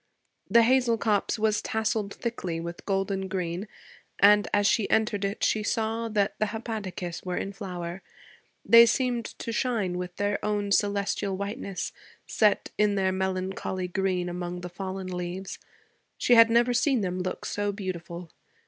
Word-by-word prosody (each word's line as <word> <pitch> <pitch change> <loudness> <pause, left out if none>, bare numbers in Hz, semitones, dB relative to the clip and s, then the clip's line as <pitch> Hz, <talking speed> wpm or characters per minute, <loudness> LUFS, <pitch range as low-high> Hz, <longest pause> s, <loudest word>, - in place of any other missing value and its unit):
The 235 0 +6
hazel 245 -1 +3
copse 215 +1 +1
was 215 -1 +1
tasseled 220 -2 -1
thickly 185 -8 -3
with 170 +1 -7
golden 195 -1 -1
green, 185 +1 -3 0.5
and 205 +1 +6
as 205 0 +2
she 210 0 +2
entered 215 -2 +1
it 200 +1 -2
she 215 - +2
saw 225 +2 -1
that 205 -2 +1
the 215 - +2
hepaticas 205 -6 -5
were 180 -1 -3
in 200 - -3
flower. 180 -2 -6 0.6
They 230 0 +9
seemed 245 -1 0
to 230 - -6
shine 220 -7 -1
with 180 0 -5
their 205 0 -1
own 205 -1 -1
celestial 200 -1 +1
whiteness, 200 -1 -4 0.3
set 210 -2 +2
in 210 -1 +3
their 190 -1 +2
melancholy 190 0 -2
green 180 -1 -1
among 175 0 -4
the 180 - -6
fallen 190 +1 -5
leaves. 180 +1 -5 0.6
She 245 - +3
had 230 -1 +8
never 240 +1 +3
seen 255 0 +2
them 185 -1 -2
look 185 0 -4
so 205 0 -1
beautiful. 175 -4 -6
200 Hz, 155 wpm, -27 LUFS, 185-220 Hz, 0.6 s, They